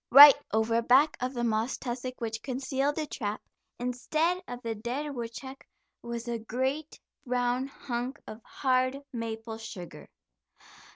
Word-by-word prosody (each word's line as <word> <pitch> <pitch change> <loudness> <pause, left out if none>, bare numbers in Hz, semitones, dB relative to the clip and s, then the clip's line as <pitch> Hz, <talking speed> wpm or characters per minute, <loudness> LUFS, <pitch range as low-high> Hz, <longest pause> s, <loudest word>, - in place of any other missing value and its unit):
Right 285 +3 +12 0.2
over 220 +1 +2
back 260 +6 +5
of 255 +1 -2
the 240 - -1
moss 225 +2 0
tussock 255 0 -5
which 225 -1 -3
concealed 270 +2 -1
the 315 - -1
trap, 215 -7 -3 0.4
instead 305 +9 0
of 245 0 -6
the 230 -1 -1
dead 250 +7 -4
woodchuck 260 +2 -7 0.4
was 235 0 -5
a 235 -1 -2
great, 260 +7 -2 0.2
brown 250 0 0
hunk 255 0 -4
of 215 - -9
hard 255 +1 0
maple 225 -1 -5
sugar. 190 -6 -9
245 Hz, 135 wpm, -29 LUFS, 230-270 Hz, 0.4 s, Right